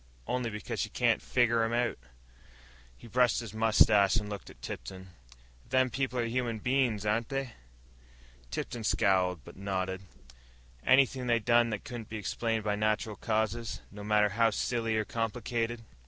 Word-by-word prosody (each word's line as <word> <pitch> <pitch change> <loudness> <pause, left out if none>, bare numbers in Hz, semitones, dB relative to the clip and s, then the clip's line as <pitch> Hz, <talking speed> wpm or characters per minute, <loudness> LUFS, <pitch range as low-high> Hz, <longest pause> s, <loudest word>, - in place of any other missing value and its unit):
Only 125 - -1
because 105 -1 -5
she - - -1
can't - - +2
figger 120 -2 +2
'em 115 +1 0
out." 120 0 0 1.0
He - - -15
brushed 125 +1 +3
his 115 -3 -7
mustache 110 -3 +5
and 105 -2 0
looked 100 -1 -7
at - - -15
Tipton. 95 0 -7 0.6
"Them 130 0 +3
people 130 +1 -2
are 120 - +1
human 120 -1 -1
bein's, 120 -3 +1
ain't 110 +2 0
they?" 135 -2 -3 1.0
Tipton 115 - -4
scowled, 95 -5 +2
but - - -12
nodded. 95 -1 -2 0.8
"Anything 130 -1 +4
they 120 -1 +4
done 120 +1 +3
that 105 -3 -4
couldn't 120 -3 -7
be 110 - -4
explained 110 +2 -1
by 105 -1 0
natural 110 0 0
causes, 110 +2 -1
no 105 0 -9
matter 105 0 +3
how 115 +3 +3
silly 115 +1 -1
or 110 - 0
complicated?" 115 +1 -2
115 Hz, 155 wpm, -30 LUFS, 105-120 Hz, 1.0 s, mustache